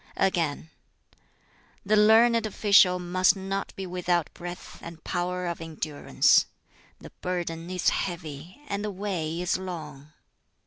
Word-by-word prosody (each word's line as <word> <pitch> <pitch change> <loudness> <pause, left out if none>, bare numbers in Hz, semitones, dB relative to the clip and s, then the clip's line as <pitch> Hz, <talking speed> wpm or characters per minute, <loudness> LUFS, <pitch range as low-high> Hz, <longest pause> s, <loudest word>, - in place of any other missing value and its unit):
Again: 165 -4 0 1.1
"The 210 +2 +3
learned 225 +1 +5
official 200 -3 +5
must 180 +2 +2
not 195 +1 -4
be 195 - -5
without 175 -2 -1
breadth 175 +1 -9
and 165 -1 -10
power 180 0 -2
of 170 -1 -4
endurance: 155 -2 +2 0.5
the - - -12
burden 175 -2 -3
is 185 -1 +1
heavy, 170 - -5
and 200 -3 -3
the 210 - -2
way 180 -5 -3
is 180 +1 0
long. 155 -6 -8
180 Hz, 125 wpm, -27 LUFS, 165-195 Hz, 1.1 s, learned